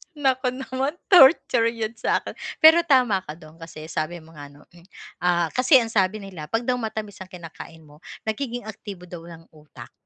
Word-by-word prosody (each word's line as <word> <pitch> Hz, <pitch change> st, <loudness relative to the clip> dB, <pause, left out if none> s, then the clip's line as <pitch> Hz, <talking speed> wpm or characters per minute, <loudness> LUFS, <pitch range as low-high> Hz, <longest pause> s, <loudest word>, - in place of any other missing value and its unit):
Naku 265 Hz, -3 st, 0 dB
naman 265 Hz, +3 st, -3 dB, 0.2 s
torture 265 Hz, -8 st, +6 dB
yun 230 Hz, -1 st, -3 dB
sa'kin. 230 Hz, -, -2 dB, 0.3 s
Pero 320 Hz, +2 st, +9 dB
tama 250 Hz, -8 st, +3 dB
ka 155 Hz, -4 st, -10 dB
dun 160 Hz, 0 st, -17 dB
kasi 160 Hz, -2 st, -10 dB
sabi 160 Hz, +2 st, -4 dB
mo 160 Hz, -, -18 dB
nga 145 Hz, -2 st, -11 dB
'no, 145 Hz, +1 st, -18 dB
hmm, 175 Hz, +1 st, -19 dB, 0.3 s
ah, 175 Hz, -2 st, +1 dB
kasi 255 Hz, +3 st, +3 dB
ang 230 Hz, -3 st, +3 dB
sabi 200 Hz, 0 st, 0 dB
nila 175 Hz, -6 st, -9 dB
pag 225 Hz, +1 st, -2 dB
daw 250 Hz, 0 st, -1 dB
matamis 215 Hz, -3 st, -6 dB
ang 190 Hz, -, -9 dB
kinakain 165 Hz, -2 st, -12 dB
mo, 150 Hz, 0 st, -19 dB, 0.2 s
nagiging 240 Hz, +2 st, -4 dB
aktibo 200 Hz, -4 st, -9 dB
daw 175 Hz, -1 st, -10 dB
ang 165 Hz, -1 st, -12 dB
utak, 150 Hz, -6 st, -15 dB
195 Hz, 185 wpm, -23 LUFS, 165-245 Hz, 0.3 s, Pero